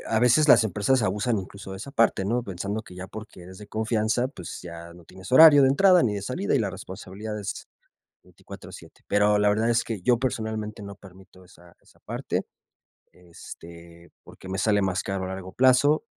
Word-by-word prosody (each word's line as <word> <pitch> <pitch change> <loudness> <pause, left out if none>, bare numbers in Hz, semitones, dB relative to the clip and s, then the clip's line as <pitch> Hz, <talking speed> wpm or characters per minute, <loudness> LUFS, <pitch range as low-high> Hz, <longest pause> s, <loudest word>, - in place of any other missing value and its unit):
a 110 - +1
veces 125 +6 +4
las 115 - +7
empresas 110 +4 +1
abusan 105 +3 0
incluso 95 +1 -9
de - - -7
esa 125 +8 -8
parte, 115 -7 +1
¿no? 120 +4 -1
Pensando 100 +1 -5
que 90 - -14
ya 90 +1 -8
porque 110 -4 -11
eres 95 +1 -12
de 105 - -11
confianza, 110 +2 -1
pues, 145 - -9
ya 85 0 -10
no 85 -1 -16
tienes 95 +6 -12
horario 145 0 +9
de 135 - +5
entrada 180 +5 +5
ni 105 -4 0
de 100 - -5
salida, 150 - -2
y - - +3
la 105 -5 -1
responsabilidad 100 +4 -8
es 100 - -6 0.5
24/7. - - -14
Pero 105 +1 +2
la 105 0 +3
verdad 110 +3 +1
es 120 0 +1
que 110 -4 -5
yo 120 +4 +2
personalmente 110 -4 -4
no 100 0 -8
permito 95 -1 -17
esa, 90 -1 -19
esa - - -25
parte, - - -4 0.7
este, 85 -1 -14
porque 95 - -13
me 95 - -3
sale 105 -1 +2
más 95 -1 -1
caro 95 -1 -3
a - - -5
largo 95 0 -7
plazo, 130 - +3
105 Hz, 195 wpm, -25 LUFS, 95-120 Hz, 0.7 s, horario